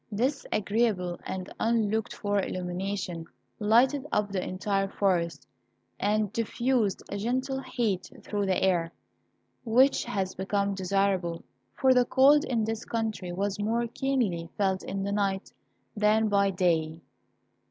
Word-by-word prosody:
This 255 +7 -1
agreeable 200 -4 0
and 185 0 -5
unlooked 220 -1 +1
for 205 -1 0
illumination 180 -2 -4 0.3
lighted 255 +7 +3
up 210 -1 0
the 190 -2 -1
entire 195 +1 -1
forest, 180 -4 0 0.5
and 210 0 +1
diffused 230 -2 0
a 200 - -2
gentle 260 +5 -1
heat 215 -9 -2
through 205 -2 -2
the 185 - +1
air, 175 -3 +2 0.7
which 250 +3 +3
was 190 -5 -1
become 200 +1 -1
desirable, 190 -3 0 0.3
for 260 -1 +4
the 250 -1 +4
cold 280 +4 +5
in 235 -3 0
this 225 0 -3
country 220 -6 -3
was 200 +3 -2
more 230 +3 0
keenly 235 -9 -1
felt 190 -2 +1
in 195 0 -4
the 200 - -2
night 200 -1 -1 0.4
than 215 +1 +3
by 200 -1 +3
day. 165 -4 0
205 Hz, 130 wpm, -28 LUFS, 190-230 Hz, 0.7 s, cold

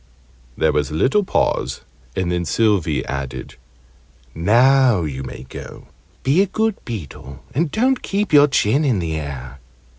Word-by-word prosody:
There - - +3
was 75 -2 0
a 75 - -5
little 135 - +2
pause, 65 - 0 0.3
and 90 -2 -1
then 90 0 0
Sylvie 90 -4 +1
added 70 -2 -5 0.8
"Now 120 +3 +4
you 70 -4 -4
may 65 -1 -8
go. - - -10 0.3
Be 145 +8 +3
a 200 - +2
good 220 +2 -1
beetle, 70 - -8
and 155 +4 0
don't 255 - +1
keep 200 -3 -2
your 145 0 +8
chin 135 +1 +2
in 130 -7 +2
the 85 -3 -2
air." 70 -3 -7
105 Hz, 150 wpm, -20 LUFS, -, 0.8 s, your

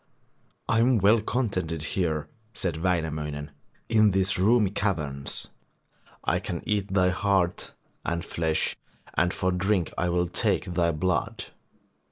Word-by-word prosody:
'I 115 - +3
am 120 +1 +4
well 105 +3 +5
contented 90 - -1
here,' 80 -2 -1 0.3
said 85 -4 -1
Wainamoinen, 80 -4 -2 0.4
'in 110 -2 +5
these 95 -1 +1
roomy 105 0 +4
caverns. 75 -10 -2 0.7
I - - +1
can 85 - -5
eat 100 -2 -1
thy 90 -1 +4
heart 95 -1 0 0.3
and 85 0 -2
flesh 80 -2 0 0.4
and 90 0 +2
for 95 -1 0
drink 90 -1 0
I 90 - +1
will 90 0 +2
take 85 - 0
thy 85 -1 +1
blood. 90 +4 -1
90 Hz, 130 wpm, -27 LUFS, 80-100 Hz, 0.7 s, well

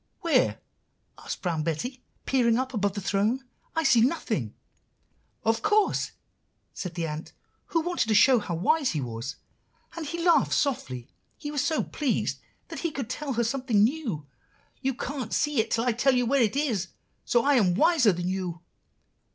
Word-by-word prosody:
"'Where?' 310 -7 +2 0.6
asked - - -6
Brown 170 -4 0
Betty, 240 - -3 0.2
peering 235 -3 +3
up 260 +1 -2
above 205 -3 0
the 200 - -4
throne. 210 +7 0 0.3
'I 325 - +1
see 245 -5 +5
nothing.' 225 - 0 0.9
"'Of 225 0 +1
course,' 420 0 +2 0.6
said 180 -2 -6
the 170 -2 -1
ant 155 0 -6 0.3
who 330 - +1
wanted 350 -7 -1
to 220 - +2
show 250 +4 +6
how 180 -5 -4
wise 265 - +2
he 155 - -1
was; 120 0 -5 0.6
and 330 -3 -5
he 340 +3 -4
laughed 345 -1 +4
softly, 130 - -1 0.3
he 295 -2 -6
was 290 -3 0
so 315 - +1
pleased 285 -5 -1 0.3
that - - -6
he 335 - -1
could 270 -5 -5
tell 285 0 -3
her 235 0 +1
something 235 -3 +2
new. 225 - -1 0.6
'You 270 -2 0
can't 260 -3 -4
see 295 -3 +1
it 220 - +1
till 230 - +1
I 245 - +2
tell 255 +3 +2
you 250 -1 +2
where 270 +2 +3
it 220 +1 +2
is, 235 -11 0 0.4
so 240 -1 +2
I 290 - +5
am 195 -9 +3
wiser 305 - +5
than 175 0 -3
you. 180 -2 -3
240 Hz, 175 wpm, -27 LUFS, 190-280 Hz, 0.9 s, show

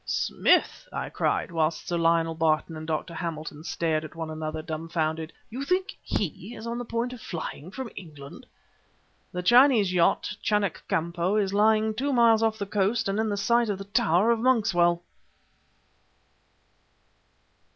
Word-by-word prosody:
"Smith!" - - +1
I - - -4
cried - - 0
whilst 160 -1 -1
Sir 175 - -1
Lionel 165 0 +2
Barton 160 0 0
and 155 0 -7
Dr. 160 +1 -2
Hamilton 155 -2 -5
stared 160 -2 -1
at 155 - -10
one 160 -1 -5
another, 155 0 -4
dumbfounded 160 0 -3 0.2
"you 255 +4 -4
think 370 +6 -1
he 200 +4 -3
is 220 - -9
on 235 +1 -3
the 245 - -5
point 235 +2 -2
of 245 - -10
flying 165 -1 -6
from 255 +3 -6
England 150 -6 -11 0.4
" - - -39
"The 180 0 -4
Chinese 240 -3 +5
yacht, 175 -2 +2
Chanak 210 -4 0
Kampo, 170 +1 0
is 200 -2 +1
lying 215 +1 +3
two 275 +6 -1
miles 230 -3 +5
off 220 -1 +1
the 200 - -3
coast 205 +3 0
and 195 +2 -1
in 220 0 +1
the 205 - -1
sight 235 +3 +2
of 200 - -1
the 195 - -7
tower 200 +1 +2
of 230 - +1
Monkswell!" 185 -9 +2
190 Hz, 160 wpm, -26 LUFS, 165-225 Hz, 0.4 s, Chinese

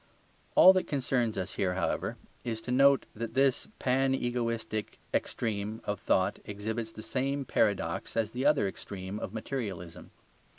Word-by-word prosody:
All 185 - +10
that 185 - 0
concerns 125 -5 0
us 95 0 -3
here, 90 -1 +1
however, 95 - -1 0.3
is 115 -2 -2
to 125 - -5
note 140 +2 +5
that 115 +1 -5
this 135 -1 +3
panegoistic 120 -4 0 0.2
extreme 110 0 -1
of 105 -1 -2
thought 95 0 +1
exhibits 110 +2 -4
the 110 - -9
same 135 +3 -1
paradox 100 -6 0
as 110 -1 +1
the 125 +3 -3
other 145 -7 +4
extreme 95 +1 -6
of - - -5
materialism. 100 -7 -5
115 Hz, 140 wpm, -30 LUFS, 100-130 Hz, 0.3 s, All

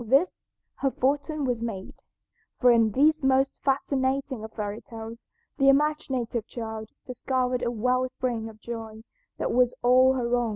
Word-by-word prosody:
With 220 - -12
this 280 +8 +4 0.5
her 275 - +1
fortune 285 +3 -1
was 245 -3 -1
made, 210 -5 -6 0.6
for 250 -1 +6
in 230 -2 +4
these 310 +5 +4
most 265 0 +2
fascinating 270 -2 0
of 220 - -7
fairy 210 0 -4
tales 225 0 -10 0.3
the 275 0 +6
imaginative 270 -6 +1
child 220 -2 -6 0.2
discovered 250 0 -1
a 240 - 0
well 250 +2 0
spring 235 -3 -3
of 215 -1 -15
joy 225 -1 -7 0.3
that - - -1
was 250 0 +3
all 255 +2 +6
her 245 -2 0
own. 240 -1 0
250 Hz, 160 wpm, -26 LUFS, 230-270 Hz, 0.6 s, for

